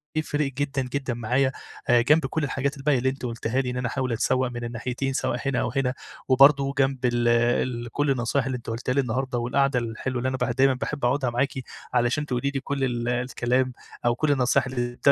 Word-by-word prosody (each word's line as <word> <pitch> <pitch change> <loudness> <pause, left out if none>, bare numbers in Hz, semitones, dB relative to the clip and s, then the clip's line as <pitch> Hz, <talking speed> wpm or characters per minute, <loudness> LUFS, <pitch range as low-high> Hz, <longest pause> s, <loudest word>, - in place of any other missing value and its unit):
هيفرق 150 -2 0
جدًا، 140 0 -1
جدًا، 130 0 -3
معايا 125 +3 +1 0.4
آآ، 120 -1 +6
جنب 150 +5 +4
كل 155 +3 -2
الحاجات 140 +1 -1
الباقية 140 0 +2
اللي 130 +2 +1
أنتِ 135 -1 -5
قُلتيها 120 +2 -1
لي 125 - -3
إن 125 - -3
أنا 125 -1 -1
أحاول 130 0 -2
أتسوق 130 +3 +1
من 120 0 -5
الناحيتين 125 +3 -3
سواء 125 - -1
هنا 135 -3 +1
أو 125 -3 -1
هنا، 130 -2 +1 0.3
وبرضه 140 +1 +5
جنب 135 -1 +1
ال 120 -1 +2
ال 120 0 +1
كل 145 +2 0
النصايح 125 +1 0
اللي 130 - -2
أنتِ 115 - -9
قلتيها 120 +3 -2
لي 140 - +3
النهاردة 130 +1 -2
والقعدة 125 +2 +1
الحلوة 120 +2 -3
اللي 125 +2 0
أنا 130 - -2
ب - - 0
دايمًا 135 +1 +4
باحب 135 +1 -3
أقعدها 130 +1 +1
معاكِ، 125 +4 0 0.4
علشان 125 +4 +1
تقولي 135 0 -1
لي 140 - -2
كل 140 0 -3
ال 120 -2 -1
الكلام 125 +1 0 0.3
أو 120 0 +3
كل 150 +3 +1
النصايح 130 -2 +2
اللي 120 -1 -3
130 Hz, 210 wpm, -25 LUFS, 120-135 Hz, 0.4 s, آآ